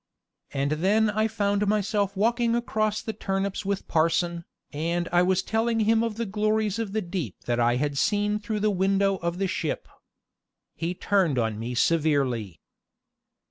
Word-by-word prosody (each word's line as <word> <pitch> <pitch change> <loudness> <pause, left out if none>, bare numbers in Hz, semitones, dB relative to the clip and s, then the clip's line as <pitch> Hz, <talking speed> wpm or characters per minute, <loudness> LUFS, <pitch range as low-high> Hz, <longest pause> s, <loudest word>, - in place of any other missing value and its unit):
And 140 +1 -1
then 210 +3 +3
I 215 +1 +1
found 205 -1 0
myself 205 -1 0
walking 230 +2 +2
across 215 -3 -1
the 220 - -4
turnips 195 0 -2
with 200 0 -2
parson, 170 +1 +1 0.3
and 170 +3 -1
I 175 0 +4
was 185 +1 +2
telling 225 +1 0
him 220 +1 +3
of 230 -2 -2
the 230 +1 -2
glories 215 +1 0
of 220 -4 -3
the 220 -1 0
deep 170 - -4
that 120 0 0
I 120 0 +3
had 140 +1 -1
seen 210 +3 +1
through 215 0 -3
the 210 0 +2
window 195 +1 +2
of 170 0 -3
the 195 - 0
ship. 190 - -3 0.9
He 175 +2 -3
turned 180 -8 +1
on 110 -3 0
me 120 +2 -4
severely. 130 - +1
195 Hz, 165 wpm, -26 LUFS, 165-215 Hz, 0.9 s, I